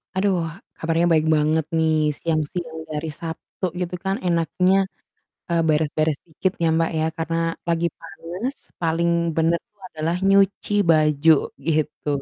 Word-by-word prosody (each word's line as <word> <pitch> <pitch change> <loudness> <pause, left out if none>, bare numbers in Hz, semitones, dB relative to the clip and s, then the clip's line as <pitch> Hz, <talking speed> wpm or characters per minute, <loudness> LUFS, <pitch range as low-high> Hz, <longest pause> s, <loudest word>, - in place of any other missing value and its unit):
Aduh, 190 -1 +2 0.4
kabarnya 165 +1 +1
baik 155 -1 +3
banget 155 +1 +2
nih. 160 -1 +3 0.2
Siang 160 -2 +1
siang 165 -3 -5
di - - -28
hari 155 +2 -3
Sabtu 165 +3 -8 0.2
gitu 180 0 -2
kan 195 - +1
enaknya, 175 +2 +2 0.8
eee, 170 -1 +3
beres-beres 155 -1 +1
dikit 170 +3 -1
ya, 165 - +4
Mbak, 165 0 +2
ya 155 - +1
karena 165 +1 -1 0.3
lagi 170 0 +2
panas, 175 - -6 0.3
paling 170 0 +1 0.3
benar 165 +1 +3
tuh 205 -1 -31
adalah 160 +2 -1
nyuci 195 +1 +3 0.2
baju 155 0 +5 0.4
gitu. 155 -1 -1
165 Hz, 140 wpm, -23 LUFS, 155-175 Hz, 0.8 s, baju